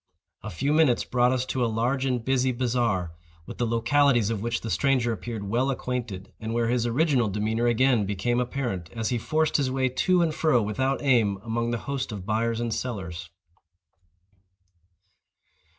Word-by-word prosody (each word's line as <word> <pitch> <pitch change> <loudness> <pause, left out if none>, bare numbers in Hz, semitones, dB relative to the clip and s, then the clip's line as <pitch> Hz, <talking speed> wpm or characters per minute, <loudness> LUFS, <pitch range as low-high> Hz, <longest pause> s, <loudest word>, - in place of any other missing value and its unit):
A - - -6
few 135 - -1
minutes 155 -6 +3
brought 125 0 +2
us 130 0 0
to 130 -1 -1
a - - +2
large 125 +5 0
and 125 -3 -1
busy 130 -1 +2
bazaar, 120 -8 0 0.3
with - - -10
the 120 - +1
localities 120 0 +2
of 110 -3 -2
which 120 +1 -2
the 115 - -4
stranger 130 -4 +2
appeared 110 -1 -6
well 120 +7 0
acquainted, 120 -7 -4
and 110 +1 -4
where 115 -1 +1
his 120 -1 +1
original 130 -1 +2
demeanor 110 +4 0
again 120 -3 +3
became 105 +5 0
apparent, 120 -9 -3
as 115 -2 -2
he 120 - 0
forced 155 +5 +1
his 140 -3 0
way 130 0 0
to 180 +7 +2
and 160 -2 0
fro, 155 -5 +2
without 130 +7 -1
aim, 115 -8 +3
among 115 +1 -2
the 120 - -1
host 135 -3 -3
of 100 -3 -6
buyers 115 +2 0
and 120 -1 -1
sellers. 90 -9 -5
120 Hz, 175 wpm, -26 LUFS, 110-130 Hz, 0.3 s, minutes